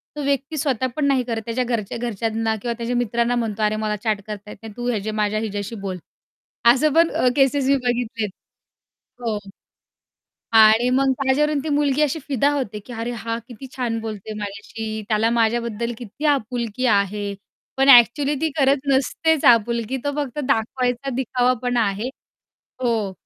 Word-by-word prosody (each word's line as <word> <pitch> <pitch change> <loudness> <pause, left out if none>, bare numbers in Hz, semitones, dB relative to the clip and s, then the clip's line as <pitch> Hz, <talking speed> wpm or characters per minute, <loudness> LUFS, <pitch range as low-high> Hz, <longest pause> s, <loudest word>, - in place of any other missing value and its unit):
तो 295 - -4
व्यक्ती 280 +2 -1
स्वतः 260 -4 0
पण 300 -2 0
नाही 265 -2 +2
करत 230 -2 -3
त्याच्या 235 +2 -1
घरच्या 235 -5 -3
घरच्यांना 225 -1 -1
किंवा 235 +1 -2
त्याच्या 235 +1 -2
मित्रांना 235 0 +1
म्हणतो, 225 -3 -2
"अरे 210 0 +2
मला 210 0 0
चॅट 210 0 -2
करतायत 210 -1 -7
नाही 220 -2 -8
तू 240 0 -3
हिच्या 215 -2 -2
माझ्या 215 0 0
हिच्याशी 205 0 -4
बोल." 185 -2 -3 0.8
असं 295 +3 +1
पण 330 +1 +5
अ, - - +1
केसेस 275 -1 +2
मी 280 - +5
बघितलेत. 235 -3 -1 0.9
हो. 225 -3 -1 1.2
आणि 220 +3 +6
मग 265 +1 +3
त्याच्यावरून 285 +2 +1
ती 315 - -3
मुलगी 290 0 +1
अशी 300 +2 +1
फिदा 280 0 +2
होते, 255 -7 -3
की 250 - -9
"अरे 230 +1 -3
हा 230 0 -2
किती 250 +2 -10
छान 240 -3 -2
बोलते 215 -1 -6
माझ्याशी, 215 +2 -5
त्याला 220 +1 +2
माझ्याबद्दल 235 0 0
किती 240 +5 -7
आपुलकी 245 -4 0
आहे." 205 -2 +1 0.4
पण 270 +1 +4
ॲक्चुअली 275 +4 +6
ती 320 - +1
करत 275 0 +2
नसतेच 310 +3 +1
आपुलकी 235 +2 +3
तो 285 - 0
फक्त 290 -1 -3
दाखवायचा, 250 +1 0
दिखावा 250 0 +1
पण 245 -1 0
आहे 215 0 0 0.7
हो, 225 -5 0
240 Hz, 165 wpm, -22 LUFS, 220-265 Hz, 1.2 s, आणि